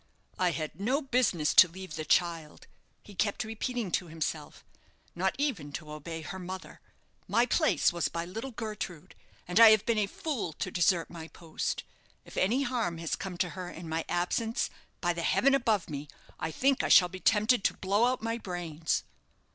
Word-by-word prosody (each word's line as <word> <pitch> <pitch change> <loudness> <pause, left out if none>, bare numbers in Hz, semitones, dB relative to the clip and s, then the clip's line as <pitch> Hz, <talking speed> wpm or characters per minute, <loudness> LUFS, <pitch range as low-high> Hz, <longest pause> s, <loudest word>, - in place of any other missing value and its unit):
"I 180 -1 +3
had 160 +1 -4
no 255 +7 +2
business 240 - +1
to 185 - +9
leave 185 -1 -9
the 155 -1 -4
child," 165 -3 0 0.4
he 205 - -13
kept 205 +4 0
repeating 225 -1 -3
to 180 - 0
himself; 155 -1 -5 0.5
"not 190 +2 0
even 235 - -1
to 155 0 -6
obey 160 +2 -6
her 190 +4 -6
mother. 185 +1 -8 0.5
My 235 +1 +3
place 310 - +2
was 170 -3 0
by 170 0 -4
little 225 +9 -5
Gertrude, 210 - -6 0.3
and 180 +5 +2
I 230 -1 +11
have 215 -2 +5
been 230 -2 +2
a 205 - +1
fool 230 - -3
to - - -4
desert 175 -1 +2
my 165 -2 -8
post. 165 -1 -4 0.4
If - - -13
any 235 +9 +2
harm 235 -10 -1
has 165 -1 -2
come 185 -2 -6
to 180 - 0
her 180 0 -6
in 170 -1 -9
my 160 0 -2
absence, 220 +6 0 0.3
by 175 - +1
the 170 - -4
heaven 275 +10 +3
above 225 -8 +2
me, 145 -1 -6 0.3
I 160 - -2
think 270 - +2
I - - -1
shall 180 - +8
be 185 +1 -8
tempted 215 +3 +3
to - - +2
blow 200 +4 +2
out 250 -2 0
my 230 +1 -2
brains." 170 -5 -2
185 Hz, 185 wpm, -30 LUFS, 165-225 Hz, 0.5 s, I